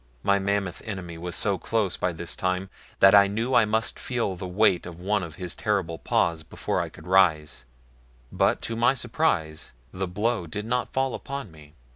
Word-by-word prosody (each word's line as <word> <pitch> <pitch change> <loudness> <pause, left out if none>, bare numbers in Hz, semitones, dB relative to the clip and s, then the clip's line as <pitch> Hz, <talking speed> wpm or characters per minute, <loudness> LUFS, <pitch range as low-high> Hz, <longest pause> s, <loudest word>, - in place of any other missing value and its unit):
My 100 0 +3
mammoth 100 -2 -1
enemy 90 -6 -6
was 90 +1 -4
so 100 -3 +1
close 105 -6 0
by 90 - -1
this 85 +1 -6
time 95 +1 -2 0.3
that 95 - +8
I 100 -1 +8
knew 115 +6 -2
I 115 - +6
must 110 +2 -1
feel 120 -7 -2
the 90 +1 -6
weight 90 -1 +2
of 85 -1 -9
one 100 +3 0
of 85 -4 -7
his 90 -2 -5
terrible 95 -7 -1
paws 85 -2 +1
before 80 - -2
I - - -4
could 75 - -14
rise, 80 -8 +2 0.7
but - - +1
to 115 - -3
my 120 +4 +3
surprise 110 - -1 0.2
the 95 0 -3
blow 105 +1 -1
did 105 +6 -5
not 125 +2 -1
fall 130 -1 0
upon 140 -8 -6
me. 75 0 -16
95 Hz, 190 wpm, -26 LUFS, 85-110 Hz, 0.7 s, that